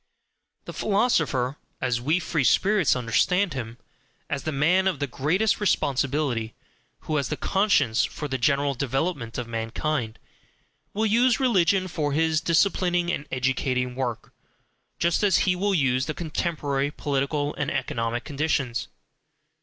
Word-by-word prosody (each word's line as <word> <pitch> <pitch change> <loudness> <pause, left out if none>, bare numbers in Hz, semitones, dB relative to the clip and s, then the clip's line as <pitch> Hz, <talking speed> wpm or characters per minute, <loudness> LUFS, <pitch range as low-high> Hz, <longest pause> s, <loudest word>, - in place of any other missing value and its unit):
The - - -7
philosopher, 160 - +1 0.2
as 125 -2 -1
WE 155 +7 +2
free 160 -4 -1
spirits 190 - +3
understand 160 - +1
him 115 -3 -6 0.5
as 140 - -1
the 155 - -1
man 170 +7 +2
of 190 - 0
the 145 - -1
greatest 160 - 0
responsibility, 140 - 0 0.5
who 155 - -2
has 140 -4 -1
the - - -3
conscience 190 - +2
for 150 - -4
the 130 -2 -3
general 140 +3 +2
development 135 -1 -2
of 125 -2 -4
mankind, 115 +2 -3 0.8
will 220 +2 +1
use 235 +2 +3
religion 195 -7 +2
for 150 -5 -2
his 160 +1 +2
disciplining 175 0 +1
and 145 - -4
educating 130 -1 0
work, 125 -3 -4 0.6
just 170 0 +1
as 195 -4 +4
he 180 - +2
will 195 +2 0
use 130 -4 +1
the 155 - -3
contemporary 150 -4 -2
political 145 0 -1
and 145 - -2
economic 120 -3 -2
conditions. 140 -5 -1
145 Hz, 140 wpm, -25 LUFS, 130-175 Hz, 0.8 s, as